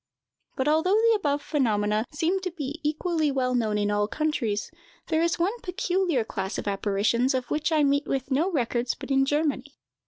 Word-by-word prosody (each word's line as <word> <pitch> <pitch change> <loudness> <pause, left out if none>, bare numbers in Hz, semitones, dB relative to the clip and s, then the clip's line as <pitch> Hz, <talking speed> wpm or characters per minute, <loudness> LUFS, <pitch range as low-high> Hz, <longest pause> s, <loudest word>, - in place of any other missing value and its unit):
But, 265 - -1
although 320 +6 +3
the 455 +1 +4
above 290 -8 -1
phenomena 215 -6 +1
seem 330 +6 0
to 375 -1 -3
be 305 -3 -6
equally 310 +1 0
well 255 -2 0
known 220 -4 +1
in 205 0 0
all 205 0 +1
countries, 245 -7 -1 0.4
there 320 0 +2
is 335 0 +1
one 390 +8 0
peculiar 360 -6 0
class 195 -2 -4
of - - -5
apparitions 210 +6 +1
of 255 -1 -3
which 305 +2 0
I 310 -2 +3
meet 285 +1 +2
with 270 0 -2
no 320 +8 +2
records 245 -4 0
but - - -8
in 270 0 +4
Germany. 290 -1 -1
285 Hz, 185 wpm, -26 LUFS, 240-320 Hz, 0.4 s, the